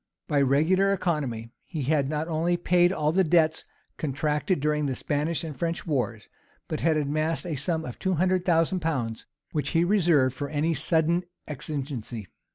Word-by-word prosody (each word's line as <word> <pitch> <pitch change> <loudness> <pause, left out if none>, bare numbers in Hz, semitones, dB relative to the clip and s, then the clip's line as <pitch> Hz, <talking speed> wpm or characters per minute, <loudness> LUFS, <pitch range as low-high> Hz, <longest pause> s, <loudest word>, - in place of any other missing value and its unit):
By 145 -1 +2
regular 160 +9 +3
economy, 145 - -2
he 155 -5 -5
had 140 0 +1
not 155 +1 -2
only 170 +2 +1
paid 175 0 +3
all 150 -5 +1
the 190 +3 +3
debts 160 -2 +3 0.3
contracted 150 +4 0
during 150 0 +1
the 130 - -2
Spanish 150 +6 -1
and 155 -3 -5
French 170 +4 -2
wars, 120 -8 -2 0.4
but 155 - -3
had 160 -2 +2
amassed 155 +3 -1
a 170 - -3
sum 160 +4 -2
of 125 - -7
two 190 -1 0
hundred 185 +2 +2
thousand 175 +1 +2
pounds, 130 -9 -2 0.2
which 145 -2 -1
he 165 - +4
reserved 170 -9 +3
for 145 +1 -4
any 155 +2 0
sudden 160 +3 +1 0.2
exigency. 130 -6 -5
155 Hz, 165 wpm, -26 LUFS, 140-170 Hz, 0.4 s, he